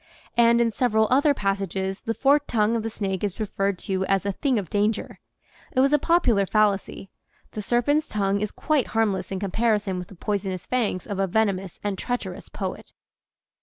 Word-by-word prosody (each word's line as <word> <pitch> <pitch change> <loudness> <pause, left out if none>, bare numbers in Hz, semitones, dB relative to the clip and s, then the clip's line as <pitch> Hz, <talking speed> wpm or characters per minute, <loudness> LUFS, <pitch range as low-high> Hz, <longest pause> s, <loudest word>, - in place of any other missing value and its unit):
And 235 0 +5
in 235 -1 +2
several 220 -2 +2
other 285 +2 +4
passages 195 -1 -2
the 225 - -3
forked 285 +1 +3
tongue 220 0 +2
of 230 - 0
the 225 - -3
snake 195 -3 -3
is 200 0 -2
referred 200 -2 -1
to 190 -1 -1
as 195 0 +1
a 200 - +1
thing 260 +5 0
of 200 -4 -2
danger. 210 +4 -1 0.5
It - - +1
was 275 +2 +4
a 295 - +5
popular 245 - +2
fallacy. 200 -2 0 0.4
The 215 - -5
serpent's 285 +8 +1
tongue 200 -1 0
is 210 - -1
quite 300 +1 0
harmless 210 -4 0
in 190 - -2
comparison 205 -1 0
with 180 - -7
the 195 - -13
poisonous 195 -1 -3
fangs 230 -7 -1
of 200 -2 -4
a 195 - +2
venomous 195 -2 0
and 205 -2 -2
treacherous 245 0 -4
poet. - - -6
210 Hz, 185 wpm, -24 LUFS, 195-235 Hz, 0.5 s, And